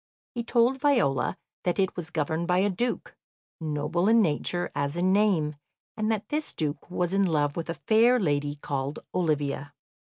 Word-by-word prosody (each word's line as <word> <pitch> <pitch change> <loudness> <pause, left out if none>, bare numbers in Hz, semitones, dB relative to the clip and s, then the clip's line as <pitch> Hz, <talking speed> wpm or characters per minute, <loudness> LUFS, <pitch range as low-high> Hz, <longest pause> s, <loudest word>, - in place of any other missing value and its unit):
He 235 - -3
told 240 +3 +2
Viola 240 - +2 0.3
that 175 - 0
it 190 -2 +1
was 175 -2 -5
governed 160 +1 -1
by 180 - +2
a 200 +2 +2
Duke, 240 +6 -3 0.4
noble 155 +3 -1
in 230 +1 +6
nature 175 -1 0
as 145 +3 -2
in 185 +2 +2
name, 180 -8 +2 0.4
and 215 0 0
that 215 -1 -2
this 300 +1 -2
Duke 150 0 -3
was 180 0 -1
in 195 - +3
love 150 -5 +1
with 170 0 -4
a 165 - -2
fair 220 - +4
lady 145 -5 0
called 140 -1 -3 0.2
Olivia. 145 -4 -1
175 Hz, 170 wpm, -27 LUFS, 150-210 Hz, 0.4 s, in